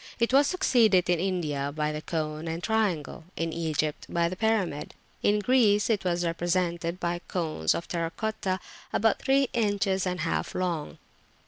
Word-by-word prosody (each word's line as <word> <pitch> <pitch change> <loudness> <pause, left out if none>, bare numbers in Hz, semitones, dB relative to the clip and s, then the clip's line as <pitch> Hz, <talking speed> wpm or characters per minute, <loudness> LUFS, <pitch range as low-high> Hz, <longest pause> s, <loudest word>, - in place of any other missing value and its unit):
It 235 +2 +1
was 280 +1 +6
succeeded 225 - +3
in 175 - +2
India 155 -7 -1
by 150 0 -1
the 150 0 -4
cone 155 0 -3
and 165 +2 -4
triangle; 200 -9 -1
in 165 -1 -2
Egypt 155 -2 -2
by 170 0 +1
the 185 - -5
pyramid; 200 -8 -1 0.3
in 205 - +3
Greece 210 -2 +3
it 210 -3 0
was 175 -1 0
represented 170 0 -1
by 175 -1 -1
cones 155 - 0
of 170 - -4
terra 165 -2 -2
cotta 190 +1 -2 0.3
about 225 -1 +2
three 270 -1 +2
inches 205 -4 +1
and 180 -2 -2
a - - -1
half 165 - -2
long. 175 -4 -2
180 Hz, 165 wpm, -27 LUFS, 165-210 Hz, 0.3 s, was